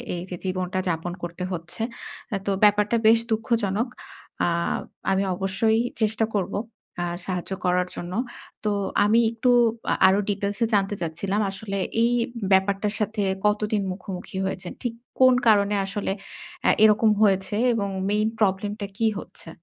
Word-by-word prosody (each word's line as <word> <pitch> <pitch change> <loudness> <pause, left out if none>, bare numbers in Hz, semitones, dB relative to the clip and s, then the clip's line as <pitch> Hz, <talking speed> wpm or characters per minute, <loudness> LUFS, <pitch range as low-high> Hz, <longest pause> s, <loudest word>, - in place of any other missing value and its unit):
এইযে 180 +1 -5
জীবনটা 185 0 -1
যাপন 170 +1 -2
করতে 175 +1 -5
হচ্ছে। 175 +4 -6 0.5
আ - - +2
তো 200 - 0
ব্যাপারটা 210 +2 +4
বেশ 225 +1 +7
দুঃখজনক। 220 0 0 0.6
আ - - +2 0.6
আমি 195 +1 +2
অবশ্যই 195 +4 +1 0.2
চেষ্টা 220 +1 +2
করবো 200 -1 -1 0.4
আ - - 0 0.2
সাহায্য 185 0 -4
করার 180 0 +2
জন্য। 175 +1 -6 0.5
তো 210 - +1 0.4
আমি 225 +3 +4
একটু 235 +2 0 0.4
আ - - +4
আরো 195 +2 +4
ডিটেইলসে 205 +3 0
জানতে 200 0 +2
চাচ্ছিলাম। 190 +6 -1
আসলে, 195 0 -5 0.3
এই 235 - +3 0.4
ব্যাপারটার 200 +2 +2
সাথে 215 0 -1 0.2
কতদিন 210 0 +1
মুখোমুখি 185 0 -7
হয়েছেন, 185 -2 -4
ঠিক 240 -2 -2 0.3
কোন 255 -1 +7
কারণে 205 -1 +4
আসলে 195 0 -3 0.5
অ্যা - - +5
এরকম 215 +1 +5
হয়েছে? 195 -1 +3 0.2
এবং 200 -3 -1 0.2
মেইন 210 +1 +2
প্রবলেমটা 205 0 0
কি 225 - +2
হচ্ছে? 165 - -11
200 Hz, 140 wpm, -24 LUFS, 190-215 Hz, 0.6 s, বেশ